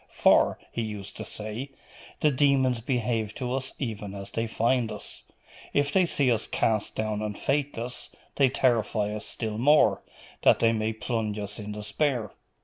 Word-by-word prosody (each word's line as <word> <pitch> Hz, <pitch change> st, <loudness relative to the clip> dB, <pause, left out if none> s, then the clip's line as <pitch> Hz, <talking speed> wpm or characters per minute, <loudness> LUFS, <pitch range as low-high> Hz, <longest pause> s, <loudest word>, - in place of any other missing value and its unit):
"For," -, -, +4 dB
he 115 Hz, -, -2 dB
used 105 Hz, -3 st, -6 dB
to -, -, -4 dB
say, 110 Hz, +6 st, -5 dB, 0.5 s
"the 150 Hz, -, +4 dB
demons 130 Hz, -3 st, +3 dB
behave 115 Hz, -3 st, -1 dB
to 125 Hz, -2 st, -3 dB
us 130 Hz, 0 st, -3 dB
even 105 Hz, -6 st, -4 dB
as 100 Hz, 0 st, -7 dB
they 115 Hz, 0 st, -1 dB
find 115 Hz, +1 st, +1 dB
us. -, -, -6 dB, 0.5 s
If 145 Hz, 0 st, +2 dB
they 185 Hz, -2 st, +4 dB
see 140 Hz, -6 st, +2 dB
us 115 Hz, -1 st, 0 dB
east 110 Hz, -2 st, +1 dB
down 110 Hz, -1 st, -1 dB
and 105 Hz, -1 st, -3 dB
faithless, 135 Hz, -4 st, -2 dB, 0.3 s
they 135 Hz, -2 st, +5 dB
terrify 115 Hz, -5 st, +1 dB
us 105 Hz, -, -5 dB
still 110 Hz, -2 st, -4 dB
more, 145 Hz, +5 st, +5 dB, 0.4 s
that -, -, +6 dB
they 115 Hz, -, +4 dB
may 110 Hz, 0 st, 0 dB
plunge 110 Hz, -2 st, -2 dB
us 105 Hz, +1 st, -5 dB
in 105 Hz, 0 st, -5 dB
despair. 105 Hz, +2 st, -1 dB
115 Hz, 165 wpm, -27 LUFS, 105-130 Hz, 0.5 s, that